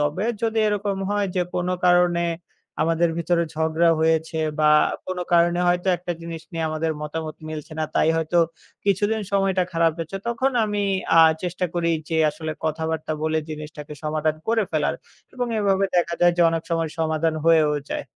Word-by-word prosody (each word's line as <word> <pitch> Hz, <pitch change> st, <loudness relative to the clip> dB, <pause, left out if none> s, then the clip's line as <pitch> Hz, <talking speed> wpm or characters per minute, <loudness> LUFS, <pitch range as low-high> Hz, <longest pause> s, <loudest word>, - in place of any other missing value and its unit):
তবে 150 Hz, +8 st, 0 dB, 0.2 s
যদি 225 Hz, 0 st, 0 dB
এরকম 205 Hz, -1 st, -1 dB
হয় 205 Hz, -1 st, +1 dB
যে -, -, +3 dB
কোন 180 Hz, 0 st, -1 dB, 0.2 s
কারণে 175 Hz, -1 st, +4 dB, 0.6 s
আমাদের 165 Hz, +1 st, +2 dB
ভিতরে 170 Hz, 0 st, +1 dB
ঝগড়া 160 Hz, +1 st, +2 dB
হয়েছে 160 Hz, 0 st, +1 dB, 0.2 s
বা 150 Hz, -, +5 dB, 0.4 s
কোন 185 Hz, -1 st, -4 dB
কারণে 170 Hz, +1 st, +4 dB
হয়তো 180 Hz, +1 st, +1 dB
একটা 175 Hz, 0 st, -4 dB
জিনিস 165 Hz, -1 st, -7 dB
নিয়ে 165 Hz, -1 st, -2 dB
আমাদের 160 Hz, 0 st, -1 dB
মতামত 155 Hz, 0 st, -5 dB
মিলছে 155 Hz, 0 st, -7 dB
না, 155 Hz, -, +1 dB
তাই -, -, +3 dB
হয়তো 165 Hz, +2 st, -1 dB, 0.5 s
কিছুদিন 205 Hz, +2 st, +1 dB
সময়টা 195 Hz, -2 st, +2 dB
খারাপ 165 Hz, -1 st, +3 dB
গেছে 165 Hz, +4 st, -4 dB
তখন 250 Hz, +3 st, +1 dB
আমি 205 Hz, -1 st, -2 dB, 0.4 s
আ -, -, +10 dB, 0.2 s
চেষ্টা 180 Hz, 0 st, -2 dB
করি 170 Hz, -1 st, 0 dB, 0.2 s
যে, 165 Hz, -, -1 dB
আসলে 155 Hz, +1 st, -5 dB
কথাবার্তা 160 Hz, 0 st, -2 dB
বলে 160 Hz, 0 st, +1 dB
জিনিসটাকে 150 Hz, -1 st, -8 dB
সমাধান 155 Hz, 0 st, 0 dB
করে 225 Hz, -1 st, +3 dB
ফেলার 155 Hz, -2 st, 0 dB, 0.4 s
এবং 245 Hz, -1 st, -2 dB
এভাবে 195 Hz, -1 st, +2 dB
দেখা 170 Hz, -1 st, +1 dB
যায় 175 Hz, 0 st, +5 dB
যে 175 Hz, -, +4 dB
অনেক 165 Hz, 0 st, -2 dB
সময় 165 Hz, -2 st, 0 dB
সমাধান 160 Hz, 0 st, 0 dB
হয়েও 160 Hz, -2 st, +4 dB, 0.2 s
যায়। -, -, -3 dB
165 Hz, 170 wpm, -23 LUFS, 160-180 Hz, 0.6 s, আ